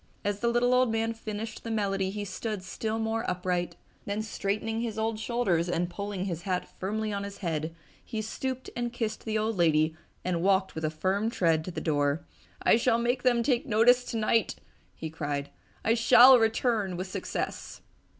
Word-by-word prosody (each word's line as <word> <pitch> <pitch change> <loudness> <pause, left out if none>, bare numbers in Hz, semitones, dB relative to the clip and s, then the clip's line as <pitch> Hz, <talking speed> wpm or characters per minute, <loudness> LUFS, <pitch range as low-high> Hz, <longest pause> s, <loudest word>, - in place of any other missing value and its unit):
As 205 0 0
the 235 - 0
little 240 +1 +3
old 250 -2 +4
man 225 0 0
finished 215 -1 -6
the 230 - -5
melody 195 -3 0
he 205 +1 -4
stood 200 +1 -4
still 220 +4 -3
more 225 0 -1
upright. 180 -1 -1 0.3
Then 205 +2 -2
straightening 220 +1 -2
his 225 -2 -3
old 220 0 -1
shoulders 200 -8 0
and 175 0 -1
pulling 200 +1 -4
his 170 -4 -3
hat 180 0 -2
firmly 215 +2 -2
on 200 0 -2
his 200 0 -7
head, 165 -2 -3 0.3
he 220 - -5
stooped 260 +3 -4
and 240 0 -2
kissed 230 -2 -3
the 220 -1 0
old 215 0 -1
lady 160 -2 +3 0.3
and 175 -2 0
walked 190 +1 +2
with 160 0 -3
a - - +1
firm 190 +7 0
tread 165 -7 +2
to - - -4
the - - -4
door. 145 0 0 0.4
"I - - +6
shall 230 0 +3
make 240 +2 0
them 240 -2 +3
take 245 -1 +1
notice 245 +3 +5
tonight!" 225 -2 +1 0.4
he 160 -1 -6
cried. 145 -2 -3 0.3
"I 225 - +4
shall 245 +2 +8
return 225 -4 +1
with 185 - -3
success!" 185 - -4
210 Hz, 185 wpm, -28 LUFS, 180-225 Hz, 0.4 s, shall